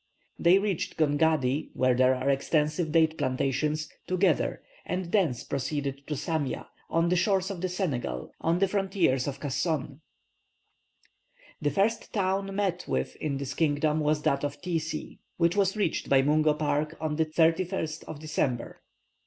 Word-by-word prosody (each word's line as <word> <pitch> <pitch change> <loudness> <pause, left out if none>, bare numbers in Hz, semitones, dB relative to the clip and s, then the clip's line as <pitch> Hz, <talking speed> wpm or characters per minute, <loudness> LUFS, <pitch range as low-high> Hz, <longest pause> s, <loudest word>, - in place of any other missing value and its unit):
They 175 +3 +6
reached 195 -4 -2
Gongadi, 150 -2 +2
where 130 -1 +3
there 130 +1 +4
are 130 +1 -3
extensive 150 +3 +1
date 160 0 +3
plantations, 140 +3 0 0.2
together, 185 -2 +1 0.2
and 180 -1 -3
thence 165 - +1
proceeded 140 0 -3
to 150 - -2
Samia, 150 0 -2 0.2
on 165 +1 +2
the 180 - +3
shores 195 +1 +1
of 180 -3 -6
the 185 - -1
Senegal, 135 - -3
on 165 +1 +2
the 195 +2 +3
frontiers 190 -10 +1
of 140 -1 -4
Kasson. 145 0 -2 1.6
The 145 - +2
first 200 +7 0
town 195 -1 -1
met 190 -3 -1
with 65 0 -1
in 145 -3 -2
this 135 -1 -4
kingdom 150 0 +1
was 150 0 +1
that 140 +1 +1
of 145 0 -3
Tiesie, 165 -3 -4 0.2
which 170 0 +2
was 195 0 +2
reached 200 -6 -1
by 135 -1 +5
Mungo 150 +1 +3
Park 150 +1 -1
on 155 -1 -2
the 160 - +3
31st 165 0 +1
of 155 - -7
December. 145 -5 -2
155 Hz, 155 wpm, -28 LUFS, 140-180 Hz, 1.6 s, They